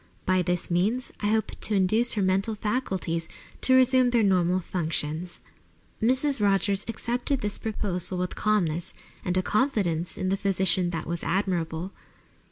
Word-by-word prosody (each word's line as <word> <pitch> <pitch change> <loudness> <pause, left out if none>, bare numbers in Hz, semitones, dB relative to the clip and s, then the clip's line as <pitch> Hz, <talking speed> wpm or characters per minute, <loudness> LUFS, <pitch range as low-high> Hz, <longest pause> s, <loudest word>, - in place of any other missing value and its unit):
By 185 -1 +3
this 180 0 -2
means 215 +9 0
I 205 - -1
hope 220 +1 +1
to 215 - +1
induce 215 +5 +3
her 205 - 0
mental 195 +4 +1
faculties 190 -7 -2 0.3
to 260 - +4
resume 255 -1 +5
their 240 -2 +2
normal 185 -2 +2
functions." 165 -1 -3 0.6
Mrs. 260 +3 +2
Rogers 200 0 +2
accepted 245 +3 -2
this 205 -2 -2
proposal 190 -4 -2
with 180 0 -2
calmness 175 -6 0 0.3
and 180 0 0
a 185 - +2
confidence 195 - 0
in 185 - -1
the 195 - +1
physician 190 -2 +2
that 165 -2 -4
was 170 +1 -4
admirable. 175 -2 -1
190 Hz, 150 wpm, -26 LUFS, 175-220 Hz, 0.6 s, resume